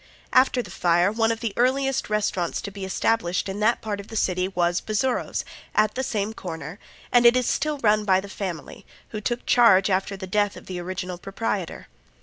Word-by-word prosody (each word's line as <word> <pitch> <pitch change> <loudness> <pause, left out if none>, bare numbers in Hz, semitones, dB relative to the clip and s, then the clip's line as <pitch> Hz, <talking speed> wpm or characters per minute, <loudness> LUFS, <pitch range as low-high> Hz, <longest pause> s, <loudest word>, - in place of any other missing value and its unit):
After 255 -1 +4
the - - -11
fire 175 +2 +2
one 225 +1 +1
of 225 - -4
the 225 -4 -2
earliest 265 +1 +1
restaurants 205 -5 -1
to 200 - -5
be 195 -1 -6
established 190 -2 0
in 195 +1 -4
that 220 +3 +2
part 210 -2 -3
of 200 - -9
the 225 - -9
city 185 -3 +1
was 175 -2 0
Bazzuro's, 230 +4 -1 0.3
at 215 0 +3
the 260 - -2
same 215 -4 -2
corner, 170 -4 -7 0.3
and 245 -1 +5
it 240 +1 +7
is 250 - +1
still 305 -1 0
run 210 -1 +4
by 190 -2 +3
the 195 - -7
family, 190 -4 -6 0.3
who 215 - -5
took 240 +3 -2
charge 205 -5 +5
after 195 +1 0
the 190 - -6
death 205 +2 0
of - - -12
the 185 -1 -5
original 180 0 -5
proprietor. 195 -2 -4
205 Hz, 200 wpm, -24 LUFS, 185-230 Hz, 0.3 s, it